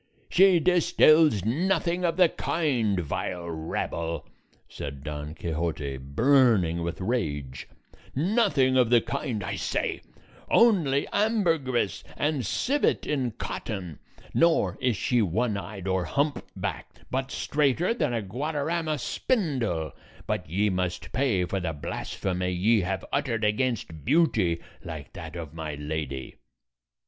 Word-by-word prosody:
"She 185 Hz, -1 st, +6 dB
distills 155 Hz, -, +4 dB
nothing 170 Hz, -, +1 dB
of 170 Hz, -1 st, +1 dB
the 180 Hz, -2 st, +7 dB
kind, 125 Hz, -, 0 dB
vile 85 Hz, +2 st, -3 dB
rabble," 80 Hz, 0 st, -3 dB, 0.4 s
said 70 Hz, -1 st, -7 dB
Don 75 Hz, 0 st, -5 dB
Quixote, 80 Hz, -4 st, -3 dB
burning 95 Hz, -, +3 dB
with 85 Hz, 0 st, -3 dB
rage; 75 Hz, -, -2 dB, 0.5 s
"nothing 145 Hz, -, +3 dB
of 125 Hz, -3 st, +4 dB
the 120 Hz, -1 st, +6 dB
kind, 130 Hz, -6 st, -3 dB
I -, -, -3 dB
say; -, -, -2 dB, 0.5 s
only 170 Hz, -, +4 dB
ambergris 165 Hz, -, +1 dB
and 145 Hz, -3 st, 0 dB
civet 275 Hz, -, +1 dB
in 130 Hz, -6 st, -1 dB
cotton; 95 Hz, -, -5 dB, 0.3 s
nor 170 Hz, 0 st, +3 dB
is 125 Hz, -5 st, +1 dB
she 120 Hz, +4 st, +2 dB
one 110 Hz, +4 st, 0 dB
eyed 100 Hz, 0 st, -6 dB
or 95 Hz, -1 st, +1 dB
hump 145 Hz, +1 st, -1 dB
backed, -, -, -5 dB
but 130 Hz, +1 st, -1 dB
straighter 150 Hz, -, +1 dB
than 150 Hz, -, 0 dB
a 115 Hz, -3 st, -1 dB
Guadarrama 155 Hz, -, -2 dB
spindle: 125 Hz, -, -1 dB, 0.3 s
but -, -, -3 dB
ye 100 Hz, +5 st, +1 dB
must 90 Hz, -1 st, -2 dB
pay 120 Hz, -10 st, +1 dB
for 95 Hz, +2 st, -2 dB
the 85 Hz, -3 st, -2 dB
blasphemy 90 Hz, +4 st, -3 dB
ye 100 Hz, +5 st, +3 dB
have 95 Hz, +1 st, -2 dB
uttered 120 Hz, -6 st, 0 dB
against 105 Hz, -, -1 dB
beauty 110 Hz, -, +2 dB, 0.2 s
like 80 Hz, -4 st, -8 dB
that 80 Hz, -3 st, -8 dB
of 80 Hz, -4 st, -6 dB
my 80 Hz, -2 st, -5 dB
lady." 75 Hz, -2 st, -5 dB
110 Hz, 125 wpm, -27 LUFS, -, 0.5 s, the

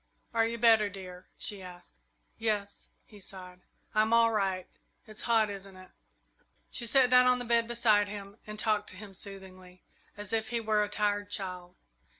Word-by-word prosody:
"Are 225 Hz, -1 st, +3 dB
you 230 Hz, +1 st, -3 dB
better, 225 Hz, -3 st, +5 dB
dear?" 185 Hz, -2 st, -10 dB
she 205 Hz, -2 st, -4 dB
asked. 180 Hz, -, -11 dB, 0.5 s
"Yes," 210 Hz, -3 st, -2 dB, 0.2 s
he 210 Hz, -, -15 dB
sighed; 180 Hz, -2 st, -9 dB, 0.3 s
"I'm 215 Hz, +1 st, +3 dB
all 230 Hz, 0 st, +5 dB
right. 195 Hz, -4 st, 0 dB, 0.4 s
It's 215 Hz, -1 st, -7 dB
hot, 220 Hz, -3 st, +4 dB
isn't 195 Hz, -1 st, -9 dB
it?" 185 Hz, 0 st, -14 dB, 0.8 s
She 235 Hz, -, -2 dB
sat 255 Hz, +1 st, +4 dB
down 250 Hz, 0 st, +7 dB
on 250 Hz, 0 st, +5 dB
the 245 Hz, -, -5 dB
bed 235 Hz, -1 st, +3 dB
beside 225 Hz, -3 st, +3 dB
him 200 Hz, 0 st, -8 dB
and 215 Hz, 0 st, -7 dB
talked 210 Hz, -1 st, 0 dB
to -, -, -9 dB
him 205 Hz, 0 st, -10 dB
soothingly, 185 Hz, -2 st, -9 dB, 0.3 s
as 205 Hz, +1 st, -4 dB
if 220 Hz, -1 st, 0 dB
he 235 Hz, 0 st, -1 dB
were 215 Hz, -2 st, +1 dB
a 205 Hz, -, -3 dB
tired 205 Hz, -1 st, 0 dB
child. 180 Hz, -3 st, -5 dB
210 Hz, 175 wpm, -30 LUFS, 190-225 Hz, 0.8 s, down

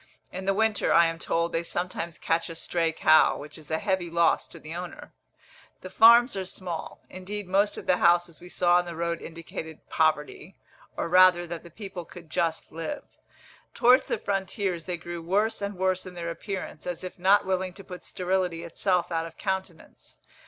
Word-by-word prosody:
In 185 Hz, +1 st, -6 dB
the 195 Hz, -, +2 dB
winter, 220 Hz, 0 st, +1 dB
I 170 Hz, -, +6 dB
am 165 Hz, 0 st, -2 dB
told, 170 Hz, 0 st, 0 dB
they 165 Hz, -, +1 dB
sometimes 170 Hz, -1 st, -4 dB
catch 165 Hz, +1 st, 0 dB
a 165 Hz, -, -7 dB
stray 165 Hz, 0 st, -1 dB
cow, 155 Hz, 0 st, +5 dB
which 150 Hz, +1 st, -10 dB
is 155 Hz, -3 st, -12 dB
a 160 Hz, -, 0 dB
heavy 190 Hz, -1 st, -1 dB
loss 170 Hz, 0 st, +2 dB
to -, -, -13 dB
the 155 Hz, +1 st, -9 dB
owner. 175 Hz, +1 st, -8 dB, 0.7 s
The 185 Hz, -, -9 dB
farms 235 Hz, +3 st, +7 dB
are 190 Hz, -, -2 dB
small. 180 Hz, -3 st, -6 dB
Indeed 195 Hz, +2 st, -6 dB
most 200 Hz, +3 st, +2 dB
of -, -, -7 dB
the 180 Hz, -, +3 dB
houses 175 Hz, -1 st, +2 dB
we 180 Hz, -, -11 dB
saw 175 Hz, 0 st, +3 dB
on 180 Hz, -, +1 dB
the 170 Hz, -1 st, -7 dB
road 170 Hz, 0 st, -2 dB
indicated 160 Hz, -1 st, -8 dB
poverty, 155 Hz, -2 st, 0 dB, 0.4 s
or -, -, -1 dB
rather 180 Hz, 0 st, +6 dB
that 170 Hz, -1 st, -6 dB
the 170 Hz, -, -13 dB
people 190 Hz, 0 st, -7 dB
could 170 Hz, -1 st, -13 dB
just 165 Hz, 0 st, -1 dB
live. 165 Hz, -, -5 dB, 0.7 s
Towards 250 Hz, +2 st, +5 dB
the -, -, -1 dB
frontiers 190 Hz, -3 st, -2 dB
they 180 Hz, -1 st, -2 dB
grew 170 Hz, 0 st, -7 dB
worse 205 Hz, +7 st, 0 dB
and 200 Hz, -1 st, -4 dB
worse 185 Hz, 0 st, 0 dB
in 180 Hz, -, -10 dB
their 170 Hz, -1 st, -4 dB
appearance, 185 Hz, -3 st, -6 dB
as 180 Hz, 0 st, -4 dB
if 185 Hz, 0 st, -8 dB
not 195 Hz, +3 st, +4 dB
willing 185 Hz, -1 st, -1 dB
to 195 Hz, -, -11 dB
put 180 Hz, -1 st, -10 dB
sterility 180 Hz, -2 st, -1 dB
itself 175 Hz, +1 st, 0 dB
out 165 Hz, 0 st, -1 dB
of 165 Hz, -, -14 dB
countenance. 190 Hz, -4 st, -5 dB
175 Hz, 195 wpm, -27 LUFS, 165-190 Hz, 0.7 s, farms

